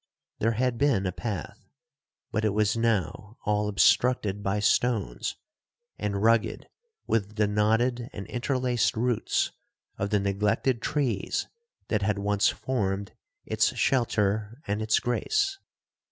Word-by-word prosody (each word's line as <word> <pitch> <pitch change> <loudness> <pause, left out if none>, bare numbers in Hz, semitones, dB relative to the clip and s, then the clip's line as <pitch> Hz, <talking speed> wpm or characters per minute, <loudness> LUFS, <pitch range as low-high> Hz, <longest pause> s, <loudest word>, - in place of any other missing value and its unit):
There 115 +2 +2
had 125 +1 0
been 140 -9 +2
a 90 - 0
path, 100 -3 -6 0.6
but 110 - -1
it 105 -2 +1
was 105 +1 +2
now 110 -1 -1
all 105 0 +1
obstructed 105 0 +3
by 100 +1 0
stones, 105 - +1 0.6
and 100 -1 -2
rugged 115 0 +2 0.4
with 105 -1 -1
the 105 -1 +3
knotted 115 +4 +1
and 100 - -7
interlaced 125 -2 0
roots 120 -1 +1 0.5
of 100 - -1
the 105 -1 +2
neglected 105 +5 0
trees 125 -10 -1 0.4
that 105 -2 +1
had 105 +1 +1
once 100 0 +2
formed 100 -6 -2 0.3
its - - +1
shelter 110 -2 +1
and 105 +2 -2
its 110 0 +2
grace. 390 - 0
110 Hz, 125 wpm, -27 LUFS, 100-120 Hz, 0.6 s, obstructed